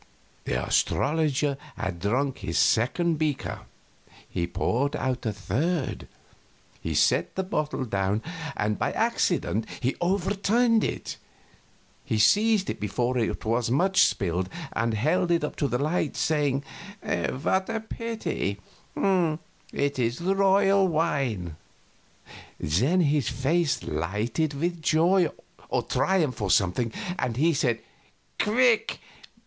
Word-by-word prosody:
The -, -, 0 dB
astrologer 145 Hz, -1 st, +1 dB, 0.2 s
had 90 Hz, -3 st, -3 dB
drunk 130 Hz, +8 st, 0 dB
his 85 Hz, -, -3 dB
second 135 Hz, -, +2 dB
beaker; 155 Hz, -3 st, -2 dB, 0.6 s
he 85 Hz, -, -2 dB
poured 115 Hz, +10 st, 0 dB
out 130 Hz, -2 st, -2 dB
a -, -, +1 dB
third. 130 Hz, -, -2 dB, 0.7 s
He -, -, -3 dB
set -, -, +2 dB
the 190 Hz, -, -1 dB
bottle 150 Hz, -8 st, -2 dB
down, 100 Hz, 0 st, -1 dB, 0.3 s
and 105 Hz, -1 st, 0 dB
by -, -, 0 dB
accident 110 Hz, +2 st, 0 dB, 0.3 s
overturned 200 Hz, +5 st, +2 dB
it. -, -, -3 dB, 0.9 s
He 110 Hz, -, -1 dB
seized 205 Hz, -, +4 dB
it -, -, -3 dB
before 105 Hz, +5 st, -1 dB
much 120 Hz, -3 st, -1 dB
was 125 Hz, -, +1 dB
spilled, 90 Hz, 0 st, +1 dB, 0.2 s
and 115 Hz, -1 st, 0 dB
held 160 Hz, -, +1 dB
it 170 Hz, -2 st, +2 dB
up 150 Hz, -, -3 dB
to 145 Hz, -, +1 dB
the 125 Hz, -, 0 dB
light, 155 Hz, +2 st, -1 dB
saying, 145 Hz, -3 st, +1 dB, 0.4 s
"What 190 Hz, +9 st, -1 dB
a 225 Hz, 0 st, -1 dB
pity 220 Hz, -, -3 dB, 0.4 s
it 155 Hz, -6 st, -1 dB
is 120 Hz, 0 st, 0 dB
royal 195 Hz, +1 st, +3 dB
wine." 135 Hz, -, -1 dB, 1.0 s
Then 130 Hz, -, +2 dB
his 145 Hz, -6 st, +2 dB
face 150 Hz, -, 0 dB
lighted 105 Hz, -, -2 dB
with 170 Hz, +3 st, -2 dB
joy 170 Hz, +3 st, +3 dB, 0.4 s
or -, -, 0 dB
triumph, 160 Hz, -, 0 dB
or 100 Hz, -, -1 dB
something, 105 Hz, +5 st, +2 dB, 0.3 s
and 120 Hz, -2 st, -1 dB
he 165 Hz, +4 st, +3 dB
said, 125 Hz, -5 st, +1 dB, 0.6 s
"Quick! 235 Hz, +1 st, +3 dB
145 Hz, 120 wpm, -26 LUFS, 110-175 Hz, 1.0 s, seized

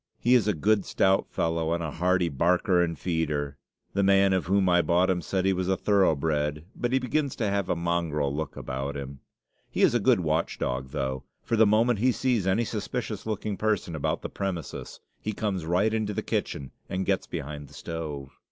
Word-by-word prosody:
He 120 Hz, -, +3 dB
is 120 Hz, -4 st, +4 dB
a 105 Hz, -, +2 dB
good, 100 Hz, +5 st, +2 dB
stout 95 Hz, +1 st, +2 dB
fellow, 80 Hz, 0 st, 0 dB
and 85 Hz, 0 st, -1 dB
a 80 Hz, -, -3 dB
hearty 90 Hz, +1 st, +1 dB
barker 90 Hz, -, +2 dB
and 85 Hz, -2 st, -2 dB
feeder. 75 Hz, -5 st, -2 dB, 0.3 s
The 100 Hz, -, +1 dB
man 95 Hz, 0 st, +4 dB
of 95 Hz, -3 st, 0 dB
whom 95 Hz, 0 st, +3 dB
I 90 Hz, -1 st, +5 dB
bought 90 Hz, +2 st, +3 dB
him 90 Hz, -1 st, 0 dB
said 95 Hz, +2 st, -1 dB
he 95 Hz, -, +3 dB
was 90 Hz, 0 st, -1 dB
thoroughbred, 80 Hz, -6 st, +1 dB
but 120 Hz, -, -2 dB
he 130 Hz, -, +4 dB
begins 135 Hz, +2 st, -1 dB
to 110 Hz, -, -1 dB
have 100 Hz, -1 st, -1 dB
a -, -, +2 dB
mongrel 85 Hz, -4 st, -1 dB
look 80 Hz, +1 st, -4 dB
about 70 Hz, +2 st, -4 dB
him. 70 Hz, 0 st, -7 dB, 0.5 s
He -, -, 0 dB
is -, -, +5 dB
a 120 Hz, -, +3 dB
good 115 Hz, -2 st, +3 dB
watch 80 Hz, 0 st, 0 dB
dog, 65 Hz, +1 st, -2 dB
though; 65 Hz, 0 st, -3 dB, 0.2 s
for 115 Hz, -, 0 dB
the 110 Hz, -1 st, +5 dB
moment 110 Hz, +1 st, +3 dB
he 130 Hz, +4 st, +4 dB
sees 120 Hz, -3 st, 0 dB
any 105 Hz, +5 st, +2 dB
suspicious 110 Hz, 0 st, -4 dB
looking 105 Hz, -1 st, -2 dB
person 105 Hz, -6 st, 0 dB
about 75 Hz, -, -1 dB
the -, -, -4 dB
premises 95 Hz, -4 st, -5 dB, 0.2 s
he 110 Hz, -, -3 dB
comes 95 Hz, -6 st, -2 dB
right 95 Hz, +6 st, +2 dB
into 105 Hz, -2 st, -1 dB
the -, -, -2 dB
kitchen 65 Hz, -, -3 dB, 0.2 s
and 95 Hz, 0 st, -2 dB
gets -, -, 0 dB
behind 75 Hz, 0 st, -6 dB
the -, -, -16 dB
stove. 75 Hz, -5 st, -5 dB
90 Hz, 205 wpm, -27 LUFS, 80-105 Hz, 0.5 s, I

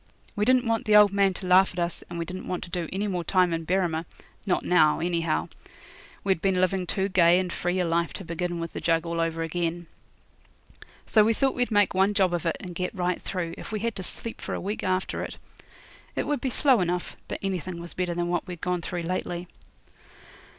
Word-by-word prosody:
We 210 Hz, -, +1 dB
didn't 255 Hz, +1 st, +4 dB
want 230 Hz, -1 st, 0 dB
the 215 Hz, -, +4 dB
old 210 Hz, -1 st, +8 dB
man 195 Hz, -2 st, +3 dB
to 185 Hz, -, -6 dB
laugh 185 Hz, +1 st, +5 dB
at 180 Hz, -, -5 dB
us, 170 Hz, 0 st, -2 dB
and 170 Hz, -, -6 dB
we 170 Hz, -, -2 dB
didn't 185 Hz, +2 st, -7 dB
want 180 Hz, -, -3 dB
to 175 Hz, -, -10 dB
do 170 Hz, -2 st, -2 dB
any 200 Hz, +3 st, -1 dB
more 180 Hz, -3 st, -2 dB
time 180 Hz, -1 st, +3 dB
in 165 Hz, 0 st, -3 dB
Berrima 175 Hz, -3 st, +1 dB, 0.4 s
not 180 Hz, -, +1 dB
now, 155 Hz, -4 st, +4 dB
anyhow. 165 Hz, -1 st, 0 dB, 0.7 s
We'd 190 Hz, -4 st, +1 dB
been 190 Hz, -1 st, +2 dB
living 185 Hz, 0 st, +1 dB
too 190 Hz, +2 st, 0 dB
gay 175 Hz, -3 st, +5 dB
and 180 Hz, -2 st, -1 dB
free 175 Hz, +1 st, -1 dB
a 180 Hz, -, +2 dB
life 170 Hz, 0 st, +1 dB
to 195 Hz, -, -6 dB
begin 170 Hz, +1 st, -3 dB
with 165 Hz, -1 st, -5 dB
the -, -, -4 dB
jug 165 Hz, 0 st, +2 dB
all 170 Hz, 0 st, -1 dB
over 165 Hz, 0 st, -1 dB
again. 170 Hz, +1 st, -2 dB, 1.2 s
So 215 Hz, -, +5 dB
we 225 Hz, +1 st, +2 dB
thought 270 Hz, +2 st, +2 dB
we'd 245 Hz, -1 st, 0 dB
make 205 Hz, -2 st, +3 dB
one 195 Hz, +2 st, +2 dB
job 190 Hz, -3 st, +3 dB
of 175 Hz, -1 st, -1 dB
it, 165 Hz, -, 0 dB
and 180 Hz, -2 st, -7 dB
get 180 Hz, +4 st, -3 dB
right 180 Hz, -1 st, -1 dB
through, 175 Hz, -3 st, -3 dB
if -, -, -8 dB
we 215 Hz, -2 st, -2 dB
had 230 Hz, -1 st, -1 dB
to -, -, -4 dB
sleep 225 Hz, +5 st, -6 dB
for -, -, -3 dB
a -, -, -3 dB
week 205 Hz, +3 st, -3 dB
after 185 Hz, 0 st, -1 dB
it. -, -, -7 dB, 0.8 s
It -, -, -1 dB
would 295 Hz, 0 st, -1 dB
be 265 Hz, -, 0 dB
slow 255 Hz, -3 st, +4 dB
enough, 180 Hz, 0 st, -2 dB
but -, -, -4 dB
anything 185 Hz, -2 st, -3 dB
was 170 Hz, 0 st, -8 dB
better 180 Hz, -1 st, -2 dB
than 175 Hz, 0 st, -1 dB
what 175 Hz, +2 st, -1 dB
we'd 180 Hz, -2 st, -6 dB
gone 180 Hz, 0 st, -1 dB
through 175 Hz, 0 st, -4 dB
lately. 175 Hz, 0 st, -3 dB
180 Hz, 230 wpm, -26 LUFS, 170-195 Hz, 1.2 s, old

